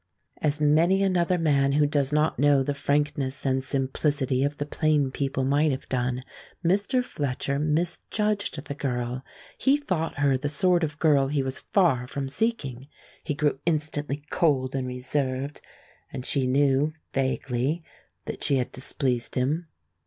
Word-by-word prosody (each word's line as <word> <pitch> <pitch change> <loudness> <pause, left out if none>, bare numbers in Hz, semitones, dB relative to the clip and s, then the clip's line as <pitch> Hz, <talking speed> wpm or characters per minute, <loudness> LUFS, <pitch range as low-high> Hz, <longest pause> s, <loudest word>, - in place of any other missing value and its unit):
As 150 0 +1
many 165 +6 +4
another 180 -2 +2
man 140 -4 +2
who 150 +1 +4
does 145 -1 +1
not 150 +1 +1
know 145 -1 +4
the 145 - -1
frankness 140 -1 -1
and 130 0 +1
simplicity 135 0 0
of 145 +1 -1
the 145 - -2
plain 150 -3 +1
people 135 -1 -1
might 145 +3 +3
have 135 -1 -3
done, 125 0 -1 0.4
Mr. 205 +8 +2
Fletcher 140 - -2
misjudged 170 +3 -1
the - - -4
girl. 125 -2 -3 0.4
He 275 +2 +4
thought 185 - -2
her 140 -2 +2
the 145 +2 -2
sort 175 +3 +3
of 155 -1 -2
girl 145 -4 +3
he 140 -1 0
was 130 0 -3
far 140 -11 +3
from 135 0 -4
seeking. 140 - -2 0.4
He 150 - -2
grew 145 -2 0
instantly 150 -2 -1
cold 135 -6 +2
and 130 -1 -2
reserved, 130 +2 -2 0.5
and 125 - -6
she 135 -3 +1
knew, 140 +3 +2 0.2
vaguely, 135 +3 -1 0.4
that - - -4
she 140 - +3
had 125 -2 -1
displeased 130 -2 -2
him. 150 +7 0
145 Hz, 155 wpm, -26 LUFS, 130-155 Hz, 0.5 s, many